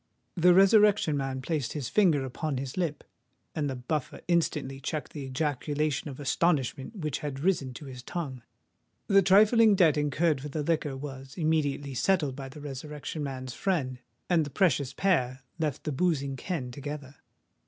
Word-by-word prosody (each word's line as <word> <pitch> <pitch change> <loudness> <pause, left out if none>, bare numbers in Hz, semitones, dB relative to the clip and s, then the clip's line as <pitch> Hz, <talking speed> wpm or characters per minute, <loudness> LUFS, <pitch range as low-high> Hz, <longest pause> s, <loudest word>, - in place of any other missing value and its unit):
The 175 0 +5
Resurrection 200 -4 +5
Man 135 -1 -3
placed 150 -5 -2
his 145 -5 -3
finger 160 - +3
upon 140 +2 -3
his 130 0 -5
lip; 165 -5 -2 0.5
and 150 -3 -1
the 135 - -3
Buffer 130 +3 -3
instantly 150 -6 0
checked 150 +2 -4
the 145 -3 -5
ejaculation 145 +2 -1
of 135 - -9
astonishment 145 - 0
which 155 -8 -3
had 140 -2 -5
risen 155 -7 +1
to 150 - -9
his 130 -2 -8
tongue. 135 -3 -5 0.6
The 195 -1 +5
trifling 210 +3 +6
debt 165 -6 +4
incurred 150 0 +1
for 150 - -6
the 150 +1 -3
liquor 150 -3 0
was 135 -1 -8
immediately 145 -4 0
settled 145 +1 +1
by 135 -1 -7
the 140 - -11
Resurrection 150 +2 -6
Man's 130 -3 -5
friend; 135 -10 -1 0.3
and 170 -3 +3
the 145 - -5
precious 145 -6 +2
pair 130 -7 0 0.2
left 150 -4 -2
the 155 - -2
boozing 140 -3 0
ken 135 -3 -4
together. 140 0 -7
145 Hz, 165 wpm, -28 LUFS, 135-170 Hz, 0.6 s, trifling